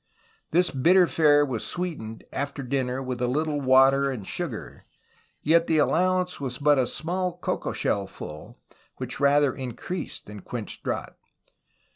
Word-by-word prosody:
This 180 Hz, +1 st, +2 dB
bitter 175 Hz, +8 st, +5 dB
fare 145 Hz, -3 st, +4 dB
was 125 Hz, -5 st, -3 dB
sweetened 150 Hz, -12 st, -4 dB
after 140 Hz, 0 st, -3 dB
dinner 130 Hz, 0 st, -1 dB
with 125 Hz, -1 st, -4 dB
a 125 Hz, -, +2 dB
little 150 Hz, +3 st, 0 dB
water 135 Hz, +1 st, +5 dB
and 120 Hz, -8 st, -5 dB
sugar; -, -, -5 dB, 0.6 s
yet 165 Hz, +2 st, +4 dB
the 160 Hz, -, +2 dB
allowance 180 Hz, +3 st, +1 dB
was 125 Hz, -3 st, -3 dB
but 145 Hz, -1 st, +4 dB
a 125 Hz, -, +2 dB
small 180 Hz, +4 st, -2 dB
cocoa -, -, -2 dB
shell 100 Hz, -1 st, -1 dB
full, 75 Hz, -4 st, -10 dB, 0.4 s
which -, -, -4 dB
rather 140 Hz, -1 st, +4 dB
in 125 Hz, -3 st, -6 dB
creased 180 Hz, +7 st, -6 dB
than 105 Hz, 0 st, -9 dB
quenched -, -, -6 dB
drought. -, -, -4 dB
140 Hz, 150 wpm, -26 LUFS, 125-165 Hz, 0.6 s, bitter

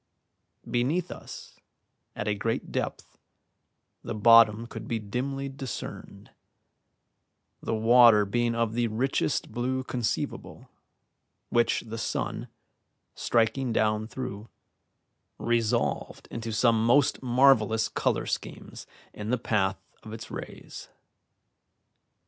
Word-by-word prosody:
Beneath 150 Hz, +9 st, 0 dB
us, -, -, -10 dB, 0.6 s
at -, -, -4 dB
a 105 Hz, -, +2 dB
great 115 Hz, +3 st, -3 dB
depth, -, -, -4 dB, 0.8 s
the -, -, -4 dB
bottom 115 Hz, 0 st, +6 dB
could -, -, -8 dB
be 115 Hz, -, -1 dB
dimly 130 Hz, +6 st, -3 dB
discerned, 135 Hz, -2 st, -8 dB, 1.3 s
the 115 Hz, -, -2 dB
water 115 Hz, -1 st, +6 dB
being 120 Hz, +3 st, 0 dB
of 115 Hz, -1 st, 0 dB
the 120 Hz, 0 st, +1 dB
richest 125 Hz, +5 st, -1 dB
blue 130 Hz, +3 st, -2 dB
conceivable, 120 Hz, -3 st, -4 dB, 0.8 s
which 120 Hz, -1 st, +2 dB
the 115 Hz, 0 st, -7 dB
sun, -, -, -3 dB, 0.7 s
striking 120 Hz, +2 st, +1 dB
down 110 Hz, -1 st, +1 dB
through, 115 Hz, -3 st, -6 dB, 0.9 s
resolved 115 Hz, -1 st, -1 dB
into 115 Hz, -1 st, -5 dB
some 110 Hz, 0 st, +3 dB
most 125 Hz, +4 st, +3 dB
marvellous 120 Hz, -4 st, +4 dB
colour -, -, -1 dB
schemes -, -, -6 dB, 0.3 s
in 105 Hz, +1 st, -6 dB
the 125 Hz, -, +2 dB
path 100 Hz, -5 st, 0 dB, 0.2 s
of 110 Hz, -, -10 dB
its 115 Hz, 0 st, -8 dB
rays. -, -, -9 dB
115 Hz, 105 wpm, -27 LUFS, 110-125 Hz, 1.3 s, bottom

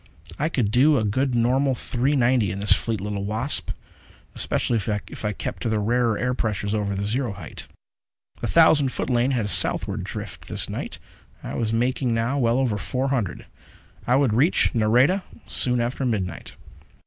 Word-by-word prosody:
I 150 Hz, +3 st, +1 dB
could 120 Hz, -10 st, 0 dB
do 140 Hz, +5 st, +4 dB
a 110 Hz, -, 0 dB
good 125 Hz, +5 st, 0 dB
normal 130 Hz, +3 st, +2 dB
three 130 Hz, +4 st, -1 dB
ninety 120 Hz, -5 st, +2 dB
in 95 Hz, +2 st, -4 dB
this 100 Hz, +1 st, +5 dB
fleet 115 Hz, -3 st, -1 dB
little 100 Hz, 0 st, -4 dB
Wasp, 110 Hz, -, -1 dB, 0.6 s
especially 120 Hz, -, -1 dB
if 105 Hz, 0 st, -4 dB
I 105 Hz, -, 0 dB
kept -, -, -6 dB
in 120 Hz, -, -1 dB
the 110 Hz, -, 0 dB
rarer 115 Hz, +1 st, +1 dB
air 125 Hz, 0 st, -1 dB
pressures 105 Hz, -4 st, -2 dB
over 100 Hz, -2 st, -1 dB
the 100 Hz, -, -3 dB
zero 115 Hz, +2 st, -2 dB
height. 90 Hz, -7 st, -10 dB, 0.7 s
The -, -, -3 dB
thousand 155 Hz, -5 st, +4 dB
foot 130 Hz, -, -3 dB
lane 120 Hz, +1 st, +2 dB
had 120 Hz, -6 st, 0 dB
a -, -, -3 dB
southward 90 Hz, -, +3 dB
drift, -, -, -7 dB
this -, -, +1 dB
night. -, -, -6 dB, 0.5 s
I -, -, -6 dB
was 110 Hz, -2 st, -1 dB
making 120 Hz, +1 st, 0 dB
now 115 Hz, +5 st, 0 dB
well 120 Hz, -1 st, +2 dB
over 120 Hz, -6 st, 0 dB
four 130 Hz, +4 st, -2 dB
hundred; 115 Hz, -10 st, -2 dB, 0.6 s
I 125 Hz, -, +3 dB
would 135 Hz, -5 st, +2 dB
reach 145 Hz, -, +3 dB
Nareda 125 Hz, -, +3 dB, 0.3 s
soon 125 Hz, -1 st, +1 dB
after 120 Hz, +3 st, -2 dB
midnight. 95 Hz, -9 st, -3 dB
120 Hz, 180 wpm, -23 LUFS, 105-130 Hz, 0.7 s, this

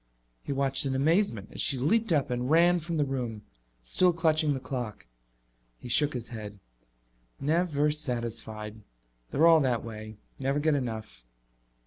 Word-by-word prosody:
He -, -, -6 dB
watched 135 Hz, 0 st, 0 dB
in 130 Hz, -, -1 dB
amazement 140 Hz, -, +1 dB
as -, -, -2 dB
she 135 Hz, -, +3 dB
leaped 205 Hz, -, +1 dB
up 145 Hz, -5 st, +1 dB
and 125 Hz, +1 st, -2 dB
ran 175 Hz, +3 st, +5 dB
from 165 Hz, 0 st, -4 dB
the 145 Hz, -, +2 dB
room, 120 Hz, -6 st, -4 dB, 0.4 s
still 180 Hz, -, +4 dB
clutching 155 Hz, -3 st, +2 dB
the -, -, -3 dB
clock. 125 Hz, -, -5 dB, 0.7 s
He 125 Hz, -, -10 dB
shook 145 Hz, +4 st, +2 dB
his 120 Hz, -1 st, -5 dB
head. 105 Hz, -3 st, -7 dB, 0.8 s
"Never 150 Hz, -1 st, +1 dB
satisfied. 115 Hz, -6 st, -3 dB, 0.5 s
They're 160 Hz, -, +3 dB
all 165 Hz, -1 st, +7 dB
that 125 Hz, -5 st, 0 dB
way. 110 Hz, -2 st, -8 dB, 0.2 s
Never 135 Hz, +1 st, 0 dB
get 155 Hz, +1 st, +2 dB
enough." 110 Hz, -, -4 dB
135 Hz, 150 wpm, -28 LUFS, 115-155 Hz, 0.8 s, all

